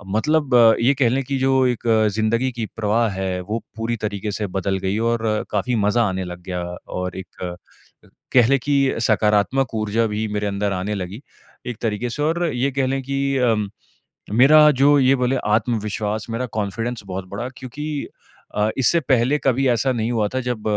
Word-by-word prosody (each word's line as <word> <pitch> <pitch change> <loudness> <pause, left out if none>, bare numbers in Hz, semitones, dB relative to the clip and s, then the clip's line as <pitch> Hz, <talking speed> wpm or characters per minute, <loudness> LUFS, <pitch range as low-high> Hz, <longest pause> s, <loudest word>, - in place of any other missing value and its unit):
मतलब 150 +2 +1 0.3
ये 135 +4 +4
कह 120 -4 +4
लें 135 +2 0
कि 135 +1 -2
जो 130 0 +3
एक 120 -2 -2 0.3
ज़िंदगी 115 +4 +1
की 115 -2 -3
प्रवाह 110 +1 +1
है, 95 -1 -3
वो 105 +5 -3 0.2
पूरी 115 +1 -1
तरीके 105 0 -3
से 105 0 -3
बदल 95 0 0
गई 100 +3 0
और 115 -1 -1 0.3
काफ़ी 105 +4 0
मज़ा 105 +2 +2
आने 95 0 -3
लग 90 0 -8
गया 90 -1 -4 0.4
और 90 0 -4
एक 95 - -10
अ, 90 -1 -4 0.8
कह 125 -3 +6
लें 135 0 +3
कि 140 -2 +2
सकारात्मक 110 +4 +2
ऊर्जा 110 +1 0
भी 110 +1 -1
मेरे 105 0 -2
अंदर 100 0 -1
आने 95 +3 -2
लगी, 95 +6 -6 0.5
एक 120 -3 -4
तरीके 115 +1 -2
से 145 +5 -3
और 170 +3 +1
ये 130 +3 0
कह 135 -1 0
लें 135 +1 -1
कि 140 +1 -1
अ, 125 -3 +3 0.8
मेरा 150 +6 +7
जो 145 0 +6
ये 135 +1 +4
बोले 125 +1 0 0.2
आत्मविश्वास, 110 -1 -2
मेरा 120 +3 -2
कॉन्फिडेंस 110 +4 -3
बहुत 95 0 -5
बढ़ा 100 +6 -5
क्योंकि 145 +3 -5 0.5
अ, 105 +1 +2
इससे 150 +6 +3
पहले 130 0 +2
कभी 135 0 +2
ऐसा 120 +2 +2
नहीं 115 0 -1
हुआ 110 -3 +1
था, 130 - 0
जब 120 -3 -3
115 Hz, 185 wpm, -21 LUFS, 105-130 Hz, 0.8 s, मेरा